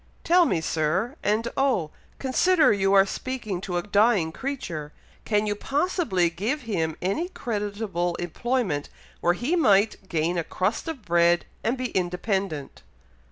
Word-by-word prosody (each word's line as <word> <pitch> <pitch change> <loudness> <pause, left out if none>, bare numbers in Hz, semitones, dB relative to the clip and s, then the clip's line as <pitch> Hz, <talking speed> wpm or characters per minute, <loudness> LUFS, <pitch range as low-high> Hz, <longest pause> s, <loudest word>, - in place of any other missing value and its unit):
Tell 350 +1 +5
me, 165 - +1
Sir! 165 - 0
and 215 +3 +1
oh! 255 - +1 0.3
consider 310 +3 +3
you 195 -1 +1
are 195 0 +7
speaking 215 -4 -4
to 180 -2 -3
a 175 - -1
dying 205 -5 +3
creature 170 - -5 0.3
can 210 -1 +1
you 205 - 0
possibly 270 - 0
give 220 - -2
him 165 -9 -2
any 305 - -1
creditable 205 - -2
employment, 185 - -2 0.3
where 175 - +3
he 245 - 0
might 205 - +3
gain 170 +1 0
a - - -1
crust 185 - -2
of 295 -9 -6
bread, 170 0 +3 0.2
and 245 +3 0
be 255 -1 -2
independent?" 180 -4 -2
200 Hz, 145 wpm, -25 LUFS, 175-250 Hz, 0.3 s, are